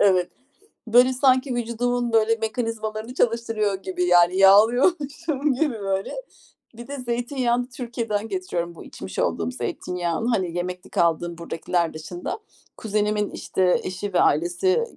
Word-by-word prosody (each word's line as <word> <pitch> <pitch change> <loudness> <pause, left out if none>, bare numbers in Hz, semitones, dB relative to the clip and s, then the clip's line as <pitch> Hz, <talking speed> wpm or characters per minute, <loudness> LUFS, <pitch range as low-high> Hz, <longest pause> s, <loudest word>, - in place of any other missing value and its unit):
Evet. 185 -3 +3 0.6
Böyle, 245 +3 +5
sanki 255 0 +2
vücudumun 240 +1 -1 0.3
mekanizmalarını 220 0 -3
çalıştırıyor 225 -4 0
gibi. 180 -1 -2
Yani, 175 +1 +5
yağlıyormuşum 275 - +4
gibi, 280 0 0
böyle. 195 -1 -2 0.6
Bir 240 - -9
de 285 - -6
zeytinyağını 245 0 -1
Türkiye'den 230 -4 -3
getiriyorum, 175 - -3
bu - - -10
içmiş - - -8
olduğum 85 0 0
zeytinyağını. 175 - -3
Hani, 185 -7 0
yemeklik 180 +1 -5
aldığım 170 0 +1
buradakiler 170 0 -2
dışında, 165 - -6 0.4
kuzenimin, 210 -1 0
işte, 185 -1 +1
eşi 190 +1 -5
ve - - +4
ailesi 175 - +2
215 Hz, 120 wpm, -24 LUFS, 180-245 Hz, 0.6 s, Böyle